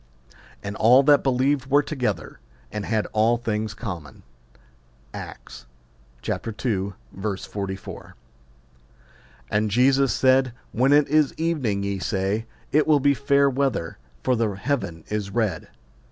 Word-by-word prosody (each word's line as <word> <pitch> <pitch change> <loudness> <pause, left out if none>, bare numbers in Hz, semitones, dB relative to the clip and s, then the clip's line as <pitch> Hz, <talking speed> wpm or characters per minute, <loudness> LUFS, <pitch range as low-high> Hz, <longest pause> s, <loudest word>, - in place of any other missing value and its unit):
And 100 +1 -5
all 125 +5 +6
that 145 0 +5
believed 135 +1 +1
were 145 +2 +4
together, 125 - -3 0.3
and 105 -1 -4
had 110 -2 0
all 110 +2 +3
things 110 -2 -3
common. 90 - -7 0.9
Acts - - -9 0.6
ii. 105 -3 -2 0.3
44. 95 -1 -5 1.4
And 105 +1 +1
Jesus 135 +4 +3
said, 130 -1 +3 0.2
When 130 +4 +2
it 145 0 +5
is 150 -1 +2
evening, 140 -12 0
ye 100 -1 -2
say, 100 +3 -1 0.2
It 155 +1 +3
will 150 -2 +5
be 140 +1 +4
fair 140 +1 +3
weather: 135 -10 -1 0.2
for 125 - +2
the 110 -4 0
heaven 100 - -3
is 105 -2 -2
red. 110 -1 -1
115 Hz, 125 wpm, -24 LUFS, 100-135 Hz, 1.4 s, all